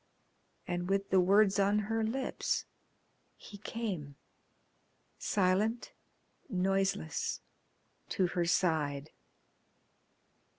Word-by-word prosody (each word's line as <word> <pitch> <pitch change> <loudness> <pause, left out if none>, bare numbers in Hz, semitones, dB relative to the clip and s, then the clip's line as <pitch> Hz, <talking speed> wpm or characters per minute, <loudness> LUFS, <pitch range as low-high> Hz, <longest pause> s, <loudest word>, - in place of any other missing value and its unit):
And 175 0 -2
with 195 0 0
the 190 - +6
words 200 +2 +4
on 200 +1 +3
her 220 +2 0
lips 260 +4 -1 0.7
he 205 - -12
came, 190 -11 -4 1.0
silent, 205 +5 +1 0.6
noiseless, 195 -4 0 0.7
to 195 -4 +1
her 175 -1 0
side. 155 -4 +1
195 Hz, 80 wpm, -32 LUFS, 175-210 Hz, 1.0 s, the